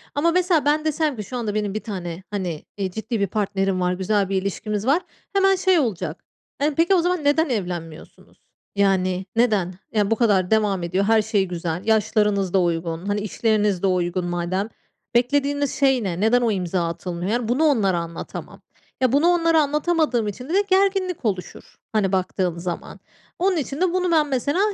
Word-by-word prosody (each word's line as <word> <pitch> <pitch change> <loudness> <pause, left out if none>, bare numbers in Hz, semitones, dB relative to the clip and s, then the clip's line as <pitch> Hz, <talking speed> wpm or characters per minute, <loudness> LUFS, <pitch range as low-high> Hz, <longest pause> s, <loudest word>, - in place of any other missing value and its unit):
Ama 330 +4 +2
mesela 355 -4 +2
ben 300 +1 +2
desem 310 -2 0
ki, 210 - -5
"Şu 250 +5 -6
anda 215 -3 -3
benim 210 -2 -1
bir 215 - -2
tane, 180 -4 -6
hani, 180 -6 -4
eee, 195 -2 -2
ciddi 220 +3 -3
bir 200 - +1
partnerim 195 -2 -1
var, 180 0 +1
güzel 195 +1 0
bir 195 -1 0
ilişkimiz 205 +2 -3
var." 305 +6 +3 0.3
Hemen 390 -1 +4
şey 375 -2 +3
olacak. 185 - -3 0.4
Hani, 290 +1 +1
"Peki, 340 +5 +3
o 355 - +3
zaman 355 -2 0
neden 290 +2 +2
evlenmiyorsunuz? 175 -7 -6 0.4
Yani, 190 -2 +1
neden? 210 -6 +2 0.2
Ya, 210 0 +1
bu - - +4
kadar 205 -5 +2
devam 205 -4 +2
ediyor, 185 +3 0
her 225 0 +4
şey 210 -2 +1
güzel, 175 -1 -3
yaşlarınız 210 -3 +2
da 190 - +4
uygun, 165 0 -2
hani, 205 +1 0
işleriniz 210 -2 0
de 195 - +4
uygun 180 -1 0
madem, 175 +4 -2 0.5
beklediğiniz 285 +3 +1
şey 265 -4 +2
ne? 180 -3 -3
Neden 235 +3 +4
o 235 -2 +2
imza 180 -3 -1
atılmıyor?" 175 +3 -4
Yani, 240 -1 -1
bunu 250 +7 +1
onlara 215 - +3
anlatamam. 170 0 -7 0.4
Ya, 255 -2 +3
bunu 290 +5 +3
onlara 330 -2 +4
anlatamadığım 300 -5 +1
için 250 +8 -6
de - - -2
de 400 - +4
gerginlik 380 -4 +1
oluşur. 190 -4 -4 0.2
Hani, 200 -3 +1
baktığım 185 -2 -1
zaman, 175 0 -5 0.4
onun 370 0 +2
için 285 +1 -3
de 365 -1 +2
bunu 365 -1 +1
ben 310 -2 +3
mesela 285 +4 0
215 Hz, 185 wpm, -22 LUFS, 185-285 Hz, 0.5 s, Hemen